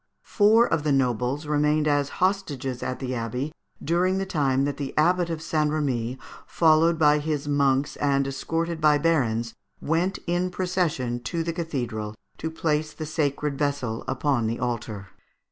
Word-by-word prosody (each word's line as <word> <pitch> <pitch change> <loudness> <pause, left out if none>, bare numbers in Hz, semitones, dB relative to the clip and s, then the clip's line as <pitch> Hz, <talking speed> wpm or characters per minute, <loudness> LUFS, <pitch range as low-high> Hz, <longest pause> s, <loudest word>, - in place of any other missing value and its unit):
Four 220 +2 +4
of 165 - 0
the 150 0 0
nobles 130 +2 0
remained 150 +1 +2
as 145 -1 +2
hostages 150 -10 -1
at 130 - -3
the 130 -1 -4
abbey 125 +5 -3 0.3
during 180 +4 +1
the 195 - -1
time 140 -7 +1
that 140 -1 -2
the 140 -2 -5
Abbot 175 +2 +3
of 165 -1 -4
St. 155 -2 +1
Remi, 130 -5 -1 0.3
followed 165 0 +4
by 150 -1 +4
his 150 -1 -2
monks 140 -1 +1
and 140 -1 +1
escorted 165 +4 -2
by 150 -1 +5
the - - -7
barons, 120 -8 +1 0.3
went 170 +5 0
in 175 +1 0
procession 175 -10 -1
to 165 +7 -1
the 170 0 -2
cathedral 120 -10 -4 0.2
to 160 - -2
place 155 -1 -1
the 155 - -6
sacred 150 -2 -1
vessel 140 -6 -1
upon 130 -3 0
the 115 +1 -2
altar. 115 -5 -4
150 Hz, 160 wpm, -25 LUFS, 130-165 Hz, 0.3 s, by